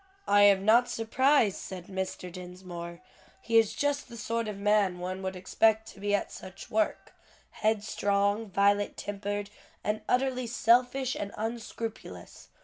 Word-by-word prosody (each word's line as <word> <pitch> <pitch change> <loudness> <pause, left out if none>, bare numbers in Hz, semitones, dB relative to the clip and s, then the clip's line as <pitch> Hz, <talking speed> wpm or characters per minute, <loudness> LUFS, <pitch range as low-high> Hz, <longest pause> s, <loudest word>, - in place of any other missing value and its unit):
"I 205 0 +5
am 200 -1 +5
not 235 +3 +5
surprised," 230 -1 +2
said 185 -2 -7
Mr. 190 -1 -5
Dinsmore, 180 -1 -8 0.4
"he 230 0 +4
is 220 -2 +1
just 285 -2 -1
the 235 - -9
sort 230 +1 -2
of 210 -2 -5
man 200 -2 +2
one 185 +1 -4
would 190 0 -4
expect 220 +4 +2
to - - -14
be 205 +1 +1
at - - -2
such 185 - -10
work, 215 0 -1 0.4
headstrong, 205 0 0
violent 200 +1 +2
tempered, 205 0 -4 0.3
and 210 +1 -1
utterly 255 -1 +1
selfish 245 +3 +2
and 200 0 -4
unscrupulous. 225 - -6
205 Hz, 140 wpm, -29 LUFS, 190-230 Hz, 0.4 s, I